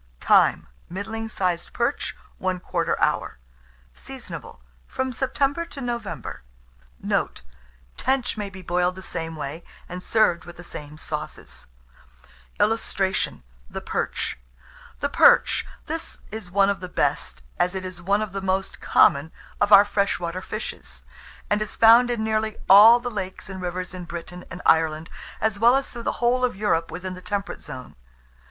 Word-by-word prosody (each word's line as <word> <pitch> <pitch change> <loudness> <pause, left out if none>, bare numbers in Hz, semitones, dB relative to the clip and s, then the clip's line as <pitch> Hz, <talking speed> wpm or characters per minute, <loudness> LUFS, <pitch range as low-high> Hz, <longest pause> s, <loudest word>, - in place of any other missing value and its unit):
Time. - - +4 0.2
Middling 220 +4 -4
sized 180 -5 -2
perch, 240 +4 -1 0.3
1/4 180 -2 -1
hour. - - 0 0.6
Seasonable - - -8 0.3
from 260 -1 -2
September 275 +5 0
to 290 - -10
November. 240 -5 -4 0.6
Note. - - -1 0.5
Tench 260 -1 0
may 205 -2 -4
be 190 -1 -11
boiled 180 +1 +1
the 190 - -9
same 165 -3 -4
way, 155 +2 -6 0.2
and 180 +1 -6
served 180 -6 +2
with 175 - -11
the 175 - -10
same 150 -3 -8
sauces. - - -6 0.9
[Illustration: 195 - 0 0.3
THE - - -5
PERCH.] - - -2 0.6
THE - - +2
PERCH. - - +5 0.2
This - - -5
is 215 -4 -6
one 195 +2 +4
of 200 - -3
the 180 0 -7
best, 65 - -1 0.2
as 180 +2 +1
it 190 0 -4
is 185 -1 -7
one 200 +4 +2
of 215 - -6
the 195 0 -4
most 190 0 -1
common, 150 +1 +4 0.3
of 205 - +3
our 200 0 +10
fresh 200 -1 0
water 175 +1 -3
fishes, 215 +3 -6 0.4
and 205 +1 +1
is 215 - -3
found 230 +2 +7
in 235 -2 -1
nearly 220 0 0
all 215 +5 +9
the 245 0 -4
lakes 190 -2 -5
and 190 -1 -7
rivers 180 +1 -4
in 180 -1 -7
Britain 175 +1 -8
and 180 - -8
Ireland, 160 0 +3 0.3
as 220 -2 0
well 235 +3 +6
as 270 0 0
through 240 - -7
the - - -1
whole 250 +1 +3
of 250 - +1
Europe 190 -5 +1
within 180 +3 -5
the 185 - -9
temperate 200 +2 -3
zone. 130 -4 -9
190 Hz, 160 wpm, -24 LUFS, 175-220 Hz, 0.9 s, our